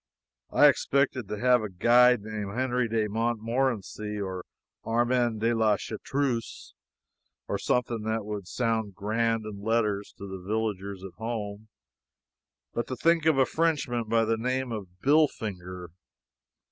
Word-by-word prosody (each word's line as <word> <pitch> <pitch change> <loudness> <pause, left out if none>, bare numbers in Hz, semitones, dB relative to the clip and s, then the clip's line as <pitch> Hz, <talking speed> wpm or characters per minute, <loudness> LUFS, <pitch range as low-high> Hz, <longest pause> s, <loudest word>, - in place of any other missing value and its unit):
I - - +6
expected 130 -5 +1
to 105 - -4
have 125 +1 +4
a 105 - -4
guide 120 +5 +5
named 105 0 -5
Henri 125 -1 +1
de 110 -1 0
Montmorency, 115 -1 -1
or 95 -2 -4 0.4
Armand 120 -1 +1
de 115 +1 +2
la 110 -2 +3
Chartreuse, 120 +2 -3 0.7
or - - -2
something 120 -2 0
that 110 0 -2
would 105 -3 -5
sound 110 -4 -1
grand 115 +2 0
in 100 -2 -7
letters 105 -2 0
to 100 - -8
the 95 -1 -7
villagers 100 -2 -3
at 95 -2 -8
home, 110 -2 -4 1.1
but 120 0 -2
to 130 - -3
think 165 +4 +2
of 155 -4 +4
a 135 - +5
Frenchman 145 -8 0
by 115 +1 +2
the 115 +1 +1
name 130 +2 -1
of 105 -4 -4 0.2
Billfinger! 95 - +1
115 Hz, 140 wpm, -28 LUFS, 105-125 Hz, 1.1 s, I